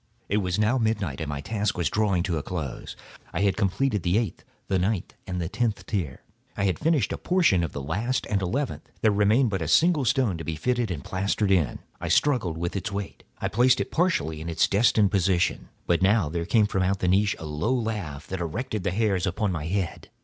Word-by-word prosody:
It 100 - +2
was 90 -3 0
now 110 +5 +2
midnight, 105 - -1
and 80 - -3
my 70 -1 -3
task 105 +3 -1
was 85 - +1
drawing 100 -5 +1
to 85 -4 -1
a - - -3
close. 80 -5 -5 0.4
I 80 - -1
had 100 -1 +2
completed 105 +2 0
the 90 +4 +1
eighth, 110 -6 -2 0.2
the 95 - +1
ninth, 95 +1 -1
and 90 -1 -3
the 85 - -2
tenth 105 +3 -1
tier. 90 -11 -3 0.3
I 100 - 0
had 95 -2 +1
finished 160 -4 +1
a - - -5
portion 170 - +3
of 85 - -2
the 70 - -5
last 105 - -1
and 100 -2 0
the 95 - -1
eleventh; 135 +8 -3
there 110 - +4
remained 105 +4 +3
but 95 -3 -1
a 80 - -2
single 155 - +4
stone 115 -7 +1
to - - -5
be 80 - -3
fitted 120 +6 0
and 80 -6 -4
plastered 100 +2 0
in. 85 -10 +2 0.2
I - - -4
struggled 115 - +2
with 85 +3 -3
its 100 +2 -3
weight; 100 0 -5 0.2
I - - -2
placed 125 +4 +3
it - - -3
partially 160 - 0
in 85 - -5
its 80 - +2
destined 105 -1 +3
position. 95 -3 +1 0.2
But 85 -1 +2
now 100 -3 +3
there 85 +1 -2
came 110 +4 +4
from 95 -2 -1
out 95 +2 +1
the 90 - -1
niche 100 +2 +3
a 80 - -8
low 75 +10 -1
laugh 105 - -2
that 95 -1 -5
erected 105 +5 -3
the 100 - +1
hairs 95 -2 +1
upon 95 +3 0
my 80 -3 -3
head. 95 -1 -3
100 Hz, 230 wpm, -26 LUFS, 85-110 Hz, 0.4 s, there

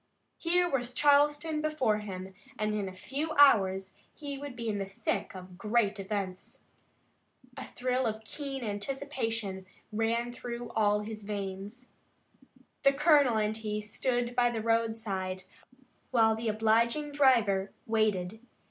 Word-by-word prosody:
Here 355 +1 +2
was 250 -5 -2
Charleston 295 +2 +3
before 285 -9 +1
him 190 -2 -7 0.2
and 215 0 0
in 205 -2 -2
a - - -8
few 280 +11 -4
hours 195 -9 +5 0.2
he 285 -2 -5
would 280 -2 -7
be 235 -2 -5
in 210 -2 -1
the 195 - -3
thick 195 - -3
of 185 0 -10
great 215 -1 +1
events. 195 -2 -4 1.0
A - - -7
thrill 255 0 -1
of 220 0 -4
keen 270 +2 -5
anticipation 225 -3 -3 0.2
ran 230 +2 0
through 240 -1 -6
all 210 -2 +2
his 215 0 -7
veins. 200 +3 -5 1.0
The 275 0 +5
colonel 285 -5 +4
and 215 0 +1
he 215 -1 -3
stood 240 +3 -1
by 245 0 +4
the 225 -2 -3
roadside 220 -5 -1 0.7
while 225 -3 +4
the 225 +1 -4
obliging 230 +7 +2
driver 230 -9 +3
waited. 215 -3 0
225 Hz, 135 wpm, -30 LUFS, 205-260 Hz, 1.0 s, hours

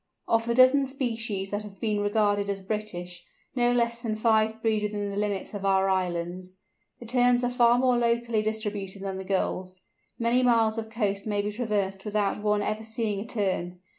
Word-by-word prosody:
Of 230 0 +2
the 235 - +1
dozen 260 +2 +6
species 225 -7 -2
that 205 +1 -1
have 205 -2 -11
been 215 -2 0
regarded 205 -1 +1
as 195 -1 -3
"British," 180 -4 -4 0.3
no 245 -1 +3
less 235 -1 +1
than 220 -2 -2
five 220 0 +2
breed 220 -1 +1
within 205 -1 -2
the - - -5
limits 205 -1 -2
of 200 -1 -5
our 195 0 +3
islands. 185 0 -2 0.4
The 240 - -10
Terns 245 +1 +3
are 245 - +1
far 240 -1 +4
more 250 0 +3
locally 235 -1 +1
distributed 210 -3 -3
than 190 -1 -4
the - - -5
Gulls. 185 -1 -2 0.4
Many 235 +2 +2
miles 230 -3 +3
of 220 0 -6
coast 205 -3 -2
may 205 -1 0
be 210 - -2
traversed 205 -4 -2
without 210 -1 -1
one 210 -1 +1
ever 215 +1 -2
seeing 220 -2 -2
a 215 - -6
Tern. 185 -5 -2
210 Hz, 190 wpm, -27 LUFS, 195-235 Hz, 0.4 s, dozen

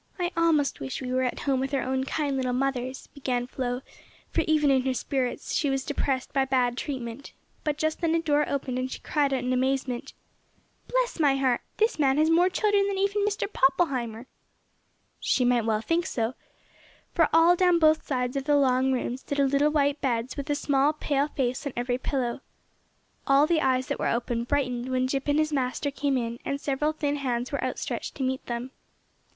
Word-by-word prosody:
"I 355 -1 -1
almost 325 -4 +2
wish 135 -1 -4
we 255 -1 -4
were 255 - +2
at 250 -1 -2
home 270 -2 +1
with 270 +1 -1
our 270 - 0
own 260 0 -1
kind 285 0 -1
little 255 -2 -1
mothers," 260 0 -2
began 255 -4 -2
Flo, 250 0 -3 0.5
for 330 - +1
even 295 -4 +3
her 260 0 -1
spirits 260 +4 -2
were 270 -2 +1
depressed 270 -1 -2
by 270 - +3
bad 255 -2 +1
treatment, 250 -1 -5 0.3
but 300 -1 -1
just 315 +1 -1
then 330 -1 +2
a - - +3
door 295 -2 +2
opened 260 -2 -2
and 255 0 -2
she - - -6
cried 290 -2 +1
out 260 -2 0
in 250 0 0
amazement, 260 -1 -1 0.7
"Bless - - 0
my 285 -3 +4
heart, 260 -3 +1 0.2
this 440 -5 +1
man 270 -1 +3
has 310 +1 +3
more 350 +3 +5
children 405 +1 +2
than 400 -1 -2
even 400 +1 +1
Mr. 410 -1 0
Poppleheimer!" 260 -5 +1 0.9
She 255 - +1
might 245 -2 +2
well 220 -1 +1
think 330 +7 0
so, 230 +1 -1 0.8
for 330 -3 +3
all 330 +2 +6
down 360 -1 +4
both 310 -1 +4
sides 250 -2 -2
of 275 -1 -2
the 295 -1 +4
long 260 -1 +3
room 250 -1 -1
stood 285 +2 -5
little 280 +1 +3
white 290 -1 +1
beds 240 -1 -1
with 285 +1 -5
a 290 - +2
small 285 0 +2
pale 290 -1 0
face 260 -1 -2
on 275 - -5
every 245 +1 -1
pillow. 260 -2 -2 0.9
All 275 +1 +5
the 320 -1 +2
eyes 255 -2 +2
that - - -2
were - - 0
open 235 0 -1
brightened 255 -2 -1
when 255 0 +1
Jip 270 +1 -2
and 290 0 +2
his 310 0 +1
master 270 +1 -1
came 280 -1 0
in, 235 -1 -3
and 280 - -2
several 285 +2 0
thin 290 -2 -2
hands 250 -3 -2
were - - -2
outstretched - - -4
to 270 - -3
meet 260 0 -1
them. 240 +2 -4
270 Hz, 200 wpm, -27 LUFS, 255-300 Hz, 0.9 s, all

